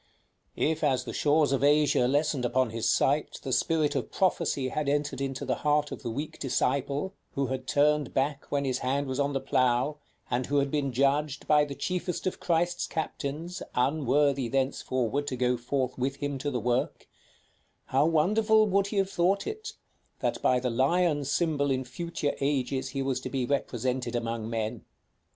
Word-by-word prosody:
If 160 0 0
as 135 -4 +2
the - - -6
shores 150 -1 +3
of 135 0 +1
Asia 145 -3 +4
lessened 145 -1 +1
upon 125 -1 +1
his 115 -1 -1
sight, 145 +3 +1
the 130 - -2
spirit 155 +1 +2
of 135 -4 -2
prophecy 170 -8 +1
had 150 +1 -1
entered 145 -1 -1
into 135 0 -3
the 130 -3 -1
heart 150 0 +2
of - - -6
the - - -4
weak 145 +7 -5
disciple 140 +6 0 0.2
who 140 - 0
had 130 0 -5
turned 150 -1 +2
back 140 +1 -1
when 140 -1 0
his 130 -1 0
hand 140 +2 0
was 130 0 -3
on 140 0 +1
the 135 - 0
plough, 130 +1 +1 0.3
and 125 0 -1
who 145 - +1
had 140 -1 +1
been 145 -3 0
judged, 140 +3 +1
by 150 -1 +5
the 140 -1 -7
chiefest 180 +1 -3
of 185 - -2
Christ's 175 +1 0
captains, 160 +2 -4
unworthy 140 0 +2
thenceforward 130 +1 -1
to 130 - -2
go 125 0 +1
forth 125 +1 -2
with 135 +2 -1
him 140 -1 -3
to 145 - -2
the 125 -3 -2
work, 120 +2 -1 0.8
how 140 +4 +2
wonderful 215 +7 +4
would 200 -1 +2
he 205 - -4
have 195 0 +1
thought 195 +3 +1
it, 435 0 -5 0.5
that - - -1
by 125 - +3
the 125 0 -1
lion 145 +5 +2
symbol 145 0 +1
in 130 -1 0
future 145 +3 -3
ages 135 -2 0
he 135 -1 -2
was 135 -2 -1
to - - -6
be 130 -2 -1
represented 125 -2 -1
among 115 -1 -2
men! 110 -2 -3
140 Hz, 180 wpm, -28 LUFS, 130-150 Hz, 0.8 s, by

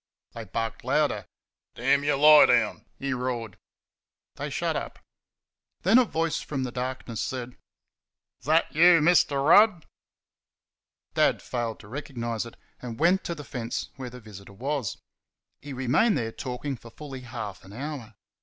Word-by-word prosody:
They 115 -1 -8
barked 115 +3 -4
louder. - - 0 0.5
"Damn 135 +4 +2
you 145 0 +2
lie 150 +2 +8
down!" - - +1
he 135 0 -2
roared. 125 -4 -4 0.7
They - - -5
shut - - -1
up. - - -4 0.8
Then 200 +8 +6
a 255 - +4
voice 165 -5 -1
from 135 -3 -3
the 125 - -3
darkness 125 -2 -4
said: 125 -1 -4 0.9
"Is 125 - -16
that 160 +2 +3
you, 170 +2 +7
Mr. 150 -3 +3
Rudd?" 205 -3 +6 1.3
Dad - - +3
failed 120 -3 -3
to 100 - -14
recognise 120 -3 -4
it, 115 - -14 0.2
and 120 -1 -7
went 180 +4 +3
to 170 - -3
the 150 - -8
fence 120 -4 -4
where 130 -2 -6
the 125 +1 -11
visitor 100 -3 -12
was. 130 0 -3 0.6
He 145 - -8
remained 135 - +2
there 115 -1 -2
talking 130 +3 -5
for 115 - -13
fully 135 +1 -9
half 110 -6 -7
an 95 - -14
hour. 125 -2 -6
130 Hz, 155 wpm, -27 LUFS, 115-150 Hz, 1.3 s, lie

